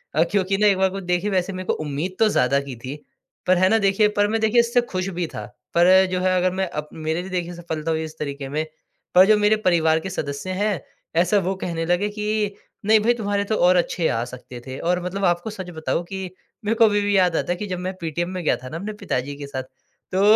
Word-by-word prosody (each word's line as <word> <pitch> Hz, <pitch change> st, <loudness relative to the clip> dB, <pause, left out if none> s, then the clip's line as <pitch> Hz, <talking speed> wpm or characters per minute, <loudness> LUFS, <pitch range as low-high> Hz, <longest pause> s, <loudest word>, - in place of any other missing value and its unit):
अ, 160 Hz, -, +5 dB
क्योंकि 195 Hz, -1 st, +1 dB
ना 210 Hz, 0 st, +4 dB
एक 195 Hz, -2 st, +4 dB
बार 190 Hz, 0 st, +3 dB
को 195 Hz, +1 st, -5 dB
देखिए 180 Hz, +3 st, 0 dB
वैसे 185 Hz, 0 st, 0 dB
मेरे 185 Hz, 0 st, -6 dB
को -, -, +2 dB
उम्मीद 155 Hz, +6 st, -3 dB
तो 220 Hz, -1 st, +5 dB
ज़्यादा 140 Hz, -5 st, +2 dB
की 125 Hz, -, -5 dB
थी। 135 Hz, +3 st, -5 dB, 0.5 s
पर 185 Hz, -1 st, +5 dB
है 185 Hz, +1 st, +4 dB
ना 225 Hz, -, +4 dB
देखिए 210 Hz, +2 st, +4 dB
पर 205 Hz, -, +5 dB
मैं 220 Hz, +1 st, -1 dB
देखिए 220 Hz, +2 st, +4 dB
इससे 235 Hz, +1 st, +2 dB
खुश 185 Hz, 0 st, -1 dB
भी 170 Hz, -, 0 dB
था। -, -, -5 dB, 0.3 s
पर 185 Hz, +2 st, +6 dB
जो 185 Hz, -, 0 dB
है 185 Hz, 0 st, +2 dB
अगर 180 Hz, 0 st, +2 dB
मैं 190 Hz, -1 st, -1 dB
अप 150 Hz, 0 st, -5 dB
मेरे 160 Hz, +2 st, -2 dB
लिए 190 Hz, -, -8 dB
देखिए 175 Hz, -1 st, -2 dB
सफलता 165 Hz, -2 st, -3 dB
हुई 160 Hz, 0 st, 0 dB
इस 155 Hz, 0 st, -8 dB
तरीके 140 Hz, -2 st, -4 dB
में। 155 Hz, +2 st, -1 dB, 0.5 s
पर 185 Hz, +1 st, +9 dB
जो 215 Hz, -1 st, +6 dB
मेरे 210 Hz, +1 st, +4 dB
परिवार 160 Hz, -2 st, +4 dB
के 190 Hz, -, -6 dB
सदस्य 140 Hz, +1 st, -4 dB
हैं 210 Hz, -4 st, 0 dB, 0.4 s
ऐसा 185 Hz, +4 st, +2 dB
वो 190 Hz, -, 0 dB
कहने 165 Hz, -2 st, -2 dB
लगे 175 Hz, +4 st, +1 dB
कि 210 Hz, -1 st, -1 dB, 0.3 s
नहीं 220 Hz, 0 st, +6 dB
भाई 235 Hz, +3 st, +3 dB
तुम्हारे 205 Hz, -3 st, -1 dB
तो 215 Hz, -, 0 dB
और 180 Hz, -1 st, +4 dB
अच्छे 175 Hz, -1 st, +1 dB
आ 115 Hz, -, 0 dB
सकते 125 Hz, 0 st, -10 dB
थे। 130 Hz, +1 st, -6 dB
और 180 Hz, +1 st, 0 dB
मतलब 190 Hz, +2 st, -2 dB
आपको 175 Hz, +4 st, +1 dB
सच 190 Hz, -4 st, -7 dB
बताऊँ 160 Hz, +1 st, -2 dB
कि 190 Hz, +1 st, -5 dB, 0.4 s
मेरे 225 Hz, +2 st, +1 dB
को 225 Hz, -, +6 dB
अभी 205 Hz, -1 st, +3 dB
भी 205 Hz, 0 st, +1 dB
याद 180 Hz, -3 st, +3 dB
आता 175 Hz, -, 0 dB
है -, -, +1 dB
कि 210 Hz, -, -4 dB
जब 180 Hz, -1 st, -3 dB
मैं 185 Hz, +1 st, -3 dB
पीटीएम 170 Hz, +2 st, -2 dB
में 185 Hz, -2 st, -4 dB
गया -, -, +3 dB
था 130 Hz, 0 st, -9 dB
ना 165 Hz, -, -5 dB
अपने 210 Hz, +4 st, -5 dB
पिताजी 140 Hz, +3 st, -2 dB
के 140 Hz, -1 st, -7 dB
साथ। 130 Hz, -2 st, -4 dB, 0.5 s
तो 190 Hz, -, +2 dB
180 Hz, 255 wpm, -23 LUFS, 160-200 Hz, 0.5 s, पर